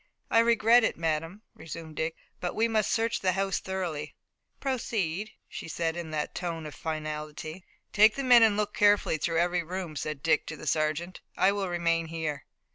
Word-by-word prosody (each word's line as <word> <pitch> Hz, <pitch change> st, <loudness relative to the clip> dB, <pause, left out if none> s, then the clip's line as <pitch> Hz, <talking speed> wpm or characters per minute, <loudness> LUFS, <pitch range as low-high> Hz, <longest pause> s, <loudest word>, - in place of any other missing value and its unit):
"I 230 Hz, -, +6 dB
regret 230 Hz, +1 st, +5 dB
it, -, -, 0 dB
madame," 165 Hz, +5 st, -2 dB
resumed 160 Hz, -1 st, -9 dB
Dick, 160 Hz, +1 st, -1 dB, 0.2 s
"but 175 Hz, -, -3 dB
we 225 Hz, +1 st, +3 dB
must 220 Hz, -2 st, +1 dB
search 230 Hz, 0 st, +1 dB
the 185 Hz, -1 st, +1 dB
house 195 Hz, +1 st, 0 dB
thoroughly." 175 Hz, -6 st, -4 dB, 0.4 s
"Proceed," 215 Hz, -, -2 dB, 0.2 s
she -, -, -7 dB
said 165 Hz, 0 st, -1 dB
again 170 Hz, -1 st, -5 dB
in -, -, -9 dB
that 150 Hz, -1 st, -2 dB
tone 165 Hz, -3 st, -4 dB
of 150 Hz, -, -7 dB
finality. 155 Hz, +1 st, -5 dB, 0.3 s
"Take 215 Hz, +1 st, +6 dB
the 275 Hz, -, -2 dB
men 245 Hz, -2 st, +7 dB
and 220 Hz, -2 st, +5 dB
look 210 Hz, -1 st, -1 dB
carefully 205 Hz, -6 st, +3 dB
through 165 Hz, +2 st, 0 dB
every 175 Hz, +1 st, +2 dB
room," 175 Hz, -1 st, -5 dB
said 145 Hz, 0 st, -4 dB
Dick 160 Hz, -2 st, +2 dB
to 155 Hz, -, -6 dB
the -, -, -9 dB
sergeant. 155 Hz, +4 st, -1 dB, 0.2 s
"I 190 Hz, -, +5 dB
will 200 Hz, -2 st, -2 dB
remain 170 Hz, -1 st, 0 dB
here." 155 Hz, -4 st, -4 dB
170 Hz, 190 wpm, -28 LUFS, 160-205 Hz, 0.4 s, men